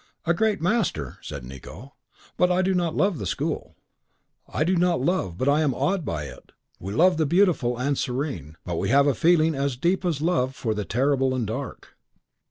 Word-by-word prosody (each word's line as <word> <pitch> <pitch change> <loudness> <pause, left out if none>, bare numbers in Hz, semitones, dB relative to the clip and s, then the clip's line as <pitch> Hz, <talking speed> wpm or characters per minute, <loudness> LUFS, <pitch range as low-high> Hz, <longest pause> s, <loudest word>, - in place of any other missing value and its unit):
"A 170 - +3
great 215 +3 +1
master," 175 - -1
said - - -7
Nicot, 65 - -10 0.5
"but 180 0 +3
I 180 +1 +2
do 190 +1 +1
not 175 -3 0
love 195 -6 +1
the 100 - -3
school." - - -3 0.8
"I - - 0
do 180 +4 +1
not 175 -2 +2
love, 130 - -1
but 130 - -1
I 145 +2 +4
am 140 -5 +1
awed 190 -2 0
by 80 - -3
it. 70 - -11 0.3
We 95 - -6
love 175 - +4
the 155 -2 +1
beautiful 165 -9 +2
and 140 +3 0
serene, 125 - -3
but 85 -2 -3
we - - -1
have 140 +1 +5
a 145 - +3
feeling 160 +4 +3
as 140 -2 -2
deep 175 +8 +1
as 170 -6 0
love 145 -5 0
for 110 -5 -2
the 105 -1 -3
terrible 130 +4 +1
and 125 -3 -1
dark." - - -6
145 Hz, 200 wpm, -25 LUFS, 120-175 Hz, 0.8 s, have